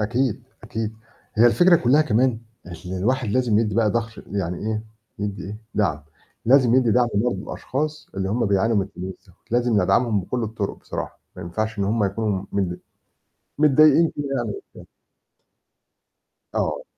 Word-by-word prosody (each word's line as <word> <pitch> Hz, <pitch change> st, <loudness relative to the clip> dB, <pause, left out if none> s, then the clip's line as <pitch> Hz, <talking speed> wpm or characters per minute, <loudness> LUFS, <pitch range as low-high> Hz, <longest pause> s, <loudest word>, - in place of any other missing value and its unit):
أكيد، 120 Hz, +2 st, 0 dB, 0.2 s
أكيد 110 Hz, -1 st, -4 dB, 0.4 s
هي 115 Hz, +2 st, +6 dB
الفكرة 175 Hz, +8 st, +6 dB
كلّها 140 Hz, +3 st, +4 dB
كمان 125 Hz, -3 st, +2 dB, 0.5 s
اللي 95 Hz, +1 st, -4 dB
الواحد 125 Hz, +4 st, 0 dB
لازم 115 Hz, -1 st, +2 dB
يدّي 110 Hz, -3 st, 0 dB
بقى 110 Hz, -1 st, +3 dB
ضَهر 115 Hz, 0 st, -3 dB
يعني 90 Hz, -3 st, -2 dB
إيه، 110 Hz, 0 st, -3 dB, 0.3 s
يدّي 100 Hz, -1 st, -4 dB
إيه، 105 Hz, +2 st, -6 dB, 0.2 s
دعم، 75 Hz, -8 st, 0 dB, 0.4 s
لازم 125 Hz, -1 st, +5 dB
يدّي 125 Hz, -3 st, +4 dB
دعم 120 Hz, +2 st, +3 dB
برضه 110 Hz, +2 st, +1 dB
لأشخاص 150 Hz, +3 st, -4 dB
اللي 95 Hz, -1 st, -2 dB
هُم 115 Hz, +3 st, 0 dB
بيعانوا 100 Hz, +3 st, +2 dB
من 100 Hz, -, +3 dB
الفلوس 95 Hz, -1 st, -8 dB
دول، -, -, -20 dB, 0.2 s
لازم 120 Hz, -4 st, +2 dB
ندعمهم 100 Hz, +3 st, +2 dB
بكُل 120 Hz, +7 st, -3 dB
الطرق 110 Hz, -2 st, -3 dB
بصراحة، -, -, -6 dB, 0.2 s
ما -, -, -7 dB
ينفعش 110 Hz, +6 st, -3 dB
إن 100 Hz, -, +1 dB
هُم 105 Hz, +2 st, +1 dB
يكونوا 100 Hz, -1 st, -1 dB
متض 95 Hz, -3 st, -1 dB, 0.8 s
متضايقين 155 Hz, +2 st, +5 dB
كده 145 Hz, -, -2 dB
يعني 120 Hz, -, -2 dB
مش 400 Hz, -, -6 dB
فاهم. -, -, -12 dB, 1.7 s
آه. -, -, -1 dB
110 Hz, 160 wpm, -23 LUFS, 100-125 Hz, 1.7 s, هي